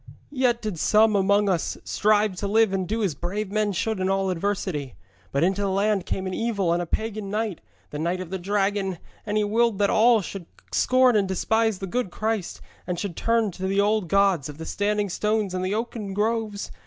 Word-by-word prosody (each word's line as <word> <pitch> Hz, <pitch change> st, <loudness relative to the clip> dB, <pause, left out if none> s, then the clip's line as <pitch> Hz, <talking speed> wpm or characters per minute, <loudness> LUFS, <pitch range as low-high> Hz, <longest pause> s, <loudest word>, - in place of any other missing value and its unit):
Yet 250 Hz, -4 st, +1 dB
did 205 Hz, -7 st, -3 dB
some 215 Hz, +3 st, +4 dB
among 200 Hz, +1 st, +3 dB
us 180 Hz, -4 st, 0 dB
strive 210 Hz, -2 st, +2 dB
to 200 Hz, -, -2 dB
live 220 Hz, 0 st, +3 dB
and 190 Hz, -2 st, -1 dB
do 220 Hz, +2 st, -1 dB
as 190 Hz, -6 st, 0 dB
brave 190 Hz, +7 st, -4 dB
men 215 Hz, 0 st, +1 dB
should 215 Hz, +2 st, -1 dB
in 185 Hz, 0 st, 0 dB
all 195 Hz, -1 st, +1 dB
adversity. 180 Hz, -, -2 dB, 0.4 s
But 140 Hz, -, +1 dB
into 190 Hz, +3 st, +1 dB
the 200 Hz, -, 0 dB
land 200 Hz, 0 st, +1 dB
came 190 Hz, -, -2 dB
an 185 Hz, -, -3 dB
evil 200 Hz, -6 st, 0 dB
and 175 Hz, -, 0 dB
a 175 Hz, -, -4 dB
pagan 215 Hz, +1 st, -3 dB
knight, 215 Hz, -2 st, -2 dB, 0.3 s
the 150 Hz, -, -5 dB
knight 170 Hz, +3 st, -1 dB
of 185 Hz, -2 st, -7 dB
the 190 Hz, -, -3 dB
Dragon, 195 Hz, 0 st, 0 dB, 0.3 s
and 210 Hz, +1 st, 0 dB
he 210 Hz, -, +2 dB
willed 225 Hz, +1 st, +2 dB
that 200 Hz, 0 st, +2 dB
all 230 Hz, 0 st, +5 dB
should 180 Hz, -2 st, -7 dB, 0.2 s
scorn 255 Hz, -1 st, +4 dB
and 200 Hz, -2 st, +2 dB
despise 220 Hz, +3 st, +1 dB
the 195 Hz, -, -5 dB
good 240 Hz, +2 st, -2 dB
Christ, 215 Hz, -1 st, -3 dB, 0.3 s
and 180 Hz, -1 st, -2 dB
should 200 Hz, -5 st, -4 dB
turn 230 Hz, -3 st, +1 dB
to 190 Hz, +2 st, -4 dB
the 195 Hz, +1 st, +1 dB
old 210 Hz, -1 st, +2 dB
gods 195 Hz, -6 st, +2 dB
of 145 Hz, -, -9 dB
the 160 Hz, -, -7 dB
standing 205 Hz, +2 st, 0 dB
stones 210 Hz, +1 st, -1 dB
and 185 Hz, 0 st, -2 dB
the 190 Hz, +3 st, -1 dB
oaken 220 Hz, -3 st, -4 dB
groves. 215 Hz, -1 st, -1 dB
200 Hz, 215 wpm, -25 LUFS, 185-215 Hz, 0.4 s, all